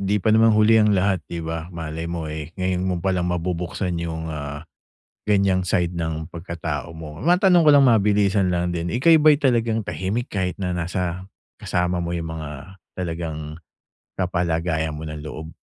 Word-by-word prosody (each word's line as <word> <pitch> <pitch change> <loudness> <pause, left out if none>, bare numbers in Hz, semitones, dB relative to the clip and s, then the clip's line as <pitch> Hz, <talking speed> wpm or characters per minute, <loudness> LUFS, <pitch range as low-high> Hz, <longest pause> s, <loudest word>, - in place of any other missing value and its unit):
Hindi 100 +1 +1
pa 110 - 0
naman 115 0 +5
huli 110 +1 +5
ang 105 -1 +4
lahat, 95 -1 +1
‘di 85 - -4
ba. 80 +1 -4
Malay 80 0 -5
mo 85 -2 -3
eh, 75 +1 -6
ngayon 90 -1 -1
mo 90 - 0
palang 90 -1 0
mabubuksan 90 +1 -2
yung, 80 -1 -4
ah, 75 0 -6 0.6
ganiyang 100 -3 +2
side 90 -1 0
ng 80 -1 -3
pagkatao 85 -1 -5
mo. 75 -2 -8
Matanong 180 0 +5
ko 150 - +7
lang 140 -1 +7
mabilisan 100 -3 +3
lang 90 0 0
din, 85 0 -3
ika’y 160 +7 +5
ba'y 150 -1 +5
talagang 115 -4 +2
tahimik 95 - -3
kahit 95 -2 -1
na 90 -1 -1
nasa 90 +1 -3 0.3
kasama 90 0 -1
mo 85 - -3
yung 85 -1 -3
mga 75 +4 -8 0.2
talagang 80 -3 -4 0.6
kapalagayan 85 -3 -1
mo 80 - -6
ng 75 -1 -6
loob? 80 +1 -8
90 Hz, 170 wpm, -22 LUFS, 80-100 Hz, 0.6 s, ko